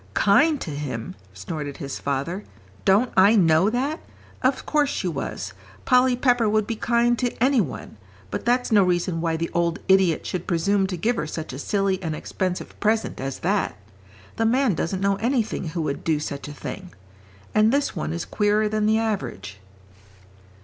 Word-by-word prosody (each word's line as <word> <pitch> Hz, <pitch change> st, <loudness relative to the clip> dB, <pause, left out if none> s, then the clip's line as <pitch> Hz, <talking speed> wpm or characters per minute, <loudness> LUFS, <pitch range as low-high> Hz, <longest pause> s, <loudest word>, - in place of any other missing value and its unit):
"Kind 285 Hz, -, +4 dB
to 155 Hz, -, -4 dB
him!" 135 Hz, -8 st, -5 dB, 0.2 s
snorted 145 Hz, -, -6 dB
his 140 Hz, -1 st, -5 dB
father, 140 Hz, +8 st, -2 dB, 0.4 s
"don't 210 Hz, +6 st, +3 dB
I 200 Hz, +4 st, +6 dB
know 170 Hz, -1 st, +4 dB
that? 270 Hz, +7 st, -1 dB, 0.4 s
Of 260 Hz, +1 st, +1 dB
course 295 Hz, -2 st, +2 dB
she 190 Hz, -, -2 dB
was. 145 Hz, -6 st, -4 dB, 0.3 s
Polly 250 Hz, 0 st, +4 dB
Pepper 245 Hz, -3 st, +2 dB
would 215 Hz, 0 st, +2 dB
be 225 Hz, -, -3 dB
kind 235 Hz, +1 st, +2 dB
to 245 Hz, -1 st, -1 dB
any 255 Hz, 0 st, +3 dB
one. 135 Hz, -, -6 dB, 0.3 s
But 100 Hz, -, -3 dB
that's 245 Hz, +1 st, +1 dB
no 210 Hz, -2 st, +6 dB
reason 175 Hz, -2 st, 0 dB
why 165 Hz, -1 st, 0 dB
the 165 Hz, +1 st, -3 dB
old 170 Hz, 0 st, +1 dB
idiot 190 Hz, -4 st, +3 dB
should 180 Hz, -1 st, -4 dB
presume 195 Hz, +3 st, +1 dB
to 185 Hz, -2 st, -4 dB
give 230 Hz, +8 st, 0 dB
her 155 Hz, -, -2 dB
such 155 Hz, -2 st, -6 dB
a 130 Hz, -, -6 dB
silly 195 Hz, +3 st, 0 dB
and 160 Hz, -3 st, -3 dB
expensive 180 Hz, +3 st, -4 dB
present 220 Hz, +1 st, 0 dB
as 135 Hz, 0 st, -4 dB
that. 200 Hz, +1 st, 0 dB, 0.6 s
The 225 Hz, -, +1 dB
man 250 Hz, -1 st, +3 dB
doesn't 185 Hz, +3 st, -2 dB
know 195 Hz, 0 st, +2 dB
anything 230 Hz, -3 st, -1 dB
who 160 Hz, +1 st, -3 dB
would 140 Hz, -2 st, -3 dB
do 155 Hz, -2 st, +1 dB
such 145 Hz, -2 st, -5 dB
a -, -, -7 dB
thing. 180 Hz, +5 st, -8 dB, 0.6 s
And 215 Hz, +1 st, +4 dB
this 280 Hz, -3 st, 0 dB
one 160 Hz, -1 st, -3 dB
is 170 Hz, +1 st, -3 dB
queerer 210 Hz, 0 st, +1 dB
than 215 Hz, 0 st, 0 dB
the 220 Hz, +1 st, +3 dB
average." 210 Hz, -, -3 dB
195 Hz, 180 wpm, -24 LUFS, 165-225 Hz, 0.6 s, I